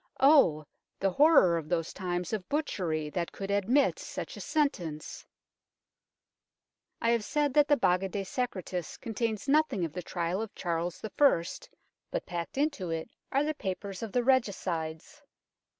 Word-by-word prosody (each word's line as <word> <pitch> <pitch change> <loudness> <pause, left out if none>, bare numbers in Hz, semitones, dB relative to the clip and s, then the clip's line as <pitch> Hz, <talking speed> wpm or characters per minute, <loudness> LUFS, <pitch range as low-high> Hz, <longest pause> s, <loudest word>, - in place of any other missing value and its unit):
Oh! 265 - +5 0.3
the 195 0 +1
horror 275 - +6
of 155 -1 -9
those 165 -2 -1
times 180 0 -3
of 195 -5 -3
butchery 170 - -1
that 170 0 -2
could 195 0 -5
admit 215 +8 +2
such - - -6
a - - -8
sentence! 175 - -2 1.7
I 230 - +2
have 235 -2 +1
said 295 +2 0
that 295 0 +5
the 290 - +4
Baga 190 -3 +2
de 200 0 -3
Secretis 185 -6 -4
contains 225 -1 -3
nothing 275 - +2
of 155 - -6
the 180 - -4
trial 175 +3 -2
of 225 - -6
Charles 170 0 -3
I., 220 - +3 0.7
but - - -3
packed 175 +5 -5
into 280 - 0
it 165 +6 -4 0.2
are 275 +2 +2
the 310 +1 0
papers 195 -5 -5
of 225 -3 -5
the 245 +2 +1
Regicides. 195 - -1
195 Hz, 150 wpm, -30 LUFS, 175-265 Hz, 1.7 s, horror